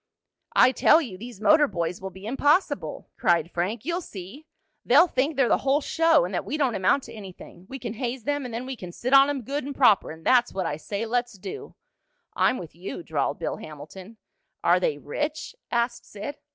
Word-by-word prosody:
"I 255 - +6
tell 305 +4 +5
you 245 - -5
these 230 +2 -10
motor 295 +7 +5
boys 175 -4 -3
will 190 - -5
be 190 +2 -12
impossible!" 285 - 0
cried 170 -1 +2
Frank. 205 +7 -2
"You'll 345 +2 -1
see! 215 - -10 0.4
They'll 345 - +6
think 300 -2 -1
they're 270 -2 +3
the - - +3
whole 275 +2 +2
show, 325 - +3
and 180 - -6
that 180 - -1
we 300 - -3
don't 270 -5 +1
amount 205 +8 +2
to - - -11
anything. 190 -3 -12
We 270 - -6
can 235 -4 -5
haze 240 +1 -4
them 290 +1 -1
and 250 - -6
then 235 +3 -4
we 265 0 -5
can 180 -6 -9
sit 250 +9 -3
on 275 +1 +8
'em 275 -3 -3
good 280 +5 -3
and 280 +1 -6
proper, 225 -7 +4
and 160 +1 -10
that's 245 -4 +3
what 190 -2 -1
I 150 - -2
say 200 +7 -4
let's 240 +1 -1
do!" 405 - -8 0.6
"I'm 255 - +2
with 165 -3 -9
you," 175 0 -7
drawled 145 -3 -1
Bill - - -3
Hamilton. 155 +8 -11 0.5
"Are - - +4
they 485 -3 0
rich?" 305 +9 -4
asked 235 0 -1
Sid. 210 +8 -7
240 Hz, 210 wpm, -25 LUFS, 190-280 Hz, 0.6 s, on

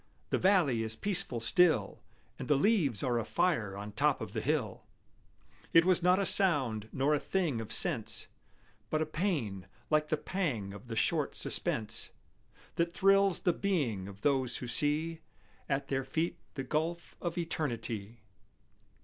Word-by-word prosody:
The - - +2
valley 175 - +3
is 110 0 -3
peaceful 195 - -1
still, 115 - +2 0.4
And - - -5
the 145 - +4
leaves 145 - +2
are 120 -2 +1
afire 115 - 0
on 105 +1 -6
top 105 - +1
of - - -7
the - - -2
hill; - - -1 0.9
It 165 0 +7
was 185 -1 +4
not 180 +2 +4
a 200 - +1
sound, 130 - +2
nor 140 +3 +1
a 150 - +2
thing 165 -12 -1
of 110 -1 -8
sense, - - 0 0.6
But 155 0 +1
a - - -3
pain, 150 - -2 0.2
like 155 0 +3
the 155 - 0
pang 140 - -2
of 100 +4 -11
the 115 - -5
short - - 0
suspense 115 0 0 0.7
That 170 +1 0
thrills 195 -1 +4
the 175 - +2
being 140 - -1
of 100 0 -11
those 130 -3 +1
who - - -5
see 150 +6 0 0.5
At 135 +1 -1
their 135 -1 0
feet 160 +6 -1 0.2
the 135 - -3
gulf 160 +5 -2
of 170 0 -3
Eternity. 120 - -3
145 Hz, 160 wpm, -31 LUFS, 115-175 Hz, 0.9 s, It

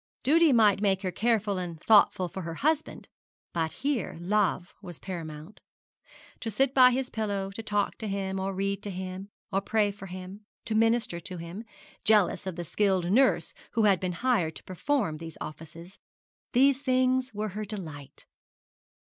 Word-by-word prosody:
Duty 320 +3 +5
might 210 -5 +4
make 195 -1 +1
her 185 - -1
careful 210 -1 +1
and 170 -3 -5
thoughtful 200 -2 +4
for 190 - -7
her 165 -1 -5
husband, 310 - -1 0.5
but 160 -2 -1
here 275 - -2
love 185 -1 0
was 175 -5 -9
paramount. 165 -1 -8 0.8
To 225 - -4
sit 265 +5 +1
by 255 -2 +8
his 255 +1 -2
pillow, 200 -3 -2
to 200 - -6
talk 205 -2 -1
to 220 - -4
him, 195 -1 -2
or 190 +1 -2
read 195 +1 -2
to 205 - -5
him, 185 +1 -6 0.2
or 195 - +2
pray 210 0 +1
for 195 -1 -10
him, 185 +3 -9 0.2
to 225 - -2
minister 225 -5 +2
to 180 +2 -7
him, 170 +7 -7 0.4
jealous 210 -3 +3
of 185 - -3
the 175 - -4
skilled 190 -1 +1
nurse 260 +5 +3 0.2
who 225 - +2
had 200 -4 +4
been 185 -1 -2
hired 185 -7 0
to - - -9
perform 195 - -1
these 165 0 -9
offices, 165 +4 -9 0.5
these 270 +2 +4
things 255 -1 +2
were 210 +1 -2
her 210 +3 -5
delight. 155 -10 -8
200 Hz, 170 wpm, -28 LUFS, 180-225 Hz, 0.8 s, by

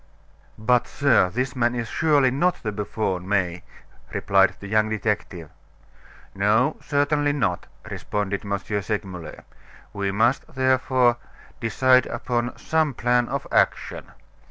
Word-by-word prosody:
"But, 120 +2 +2
sir, 140 -10 +3
this 125 +6 -2
man 120 -1 +1
is 120 -1 -3
surely 145 -1 +2
not 175 +7 0
the 110 - -2
buffoon, 100 -3 -3
May," 90 -3 0 0.5
replied 95 -1 +3
the - - -10
young 110 +1 +2
detective. 105 -7 -3 0.8
"No, - - +2
certainly 145 0 +1
not," 100 -11 -1 0.2
responded 100 -1 -3
M. 100 -1 -1 0.2
Segmuller; 95 -5 -5 0.5
"we 100 -1 -2
must, 115 +8 0
therefore, 130 -2 +2 0.4
decide 130 +2 +3
upon 120 +1 -2
some 160 -4 0
plan 120 +1 +1
of - - -3
action." - - 0
120 Hz, 120 wpm, -23 LUFS, 100-130 Hz, 0.8 s, sir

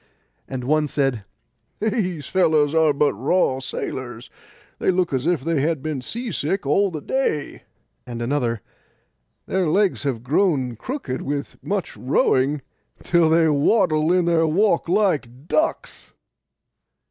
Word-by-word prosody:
And 130 -2 -5
one 150 +3 +2
said, 135 -7 -1 0.5
'These 195 - -1
fellows 155 -5 +2
are 160 -2 +4
but 145 +1 +2
raw 130 - +1
sailors; 125 -2 -6 0.5
they - - +1
look 180 -4 +1
as 130 +3 -1
if 175 -5 +1
they 165 0 0
had 155 -2 -1
been 155 -4 -3
sea 235 - -5
sick 175 +2 -2
all 195 +8 +3
the 155 -4 -6
day.' 155 - -2 0.5
And 120 -1 -6
another, 120 -3 -1 0.8
'Their 190 -2 0
legs 195 +4 +2
have 130 -5 -2
grown 135 -4 +1
crooked 145 - -5
with 140 0 -4
much 195 -3 -3
rowing, 135 +2 +1 0.4
till 170 -2 +3
they 165 0 +4
waddle 155 +1 +2
in 180 -1 +3
their 165 -1 +3
walk 175 +1 +2
like 155 - 0
ducks. 315 - -1
155 Hz, 135 wpm, -22 LUFS, 135-180 Hz, 0.8 s, are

